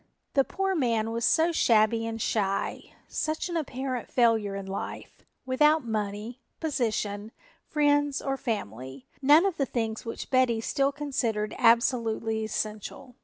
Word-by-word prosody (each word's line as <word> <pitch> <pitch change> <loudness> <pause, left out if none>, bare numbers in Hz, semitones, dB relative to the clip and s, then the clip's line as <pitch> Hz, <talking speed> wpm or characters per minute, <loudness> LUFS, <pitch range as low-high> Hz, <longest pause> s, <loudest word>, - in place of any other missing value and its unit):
The 275 - +4
poor 385 +6 -1
man 230 -8 0
was 230 0 -1
so 325 +2 +4
shabby 225 -5 +3
and 225 0 -4
shy, 195 -3 -2
such 315 +3 -2
an 345 - -4
apparent 265 -5 -3
failure 225 -5 +2
in 195 -1 -5
life, 195 +1 -6 0.2
without 300 +3 +3
money, 215 +2 -4 0.2
position, 220 -8 -2 0.4
friends 290 -1 +2
or 270 -1 -2
family, 130 - -5 0.2
none 295 +6 +6
of 390 -4 0
the 275 - 0
things 225 -2 -2
which 230 - -6
Betty 255 -3 +3
still 275 +5 +1
considered 245 -7 -2
absolutely 230 -1 +2
essential. 215 +4 -4
235 Hz, 135 wpm, -27 LUFS, 215-275 Hz, 0.4 s, none